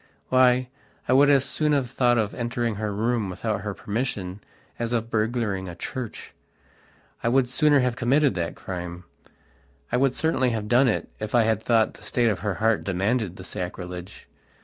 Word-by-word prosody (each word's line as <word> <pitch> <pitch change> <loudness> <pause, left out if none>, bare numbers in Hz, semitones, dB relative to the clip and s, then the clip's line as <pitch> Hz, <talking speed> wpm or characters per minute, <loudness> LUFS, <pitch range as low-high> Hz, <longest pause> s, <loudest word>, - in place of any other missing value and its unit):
Why, 130 0 +4 0.4
I - - +3
would 140 +2 +6
as 140 -2 +4
soon 150 -1 0
have 130 -4 0
thought 120 -2 +3
of 105 -2 0
entering 120 -1 -2
her 105 0 -2
room 110 0 0
without 100 +2 -2
her 105 -1 -4
permission 105 -4 -3 0.4
as 120 0 -2
of 115 -1 -1
burgling 105 -4 -1
a 85 - -8
church. 120 +6 -6 0.9
I 115 - +1
would 130 +1 +3
sooner 145 +2 +3
have 125 -1 0
committed 135 +3 +3
that 85 -2 -3
crime. 90 -1 -6 0.9
I - - +2
would 130 -1 +2
certainly 160 -5 +1
have 110 -3 -3
done 125 +4 +4
it 115 - -1
if 110 +2 -3
I 120 - +6
had 110 -1 +1
thought 115 -1 +2
the - - -16
state 120 -2 +1
of 105 - -1
her 100 -3 -2
heart 110 +3 +1
demanded 100 +1 0
the 95 - -10
sacrilege. 90 0 -7
115 Hz, 180 wpm, -25 LUFS, 100-125 Hz, 0.9 s, would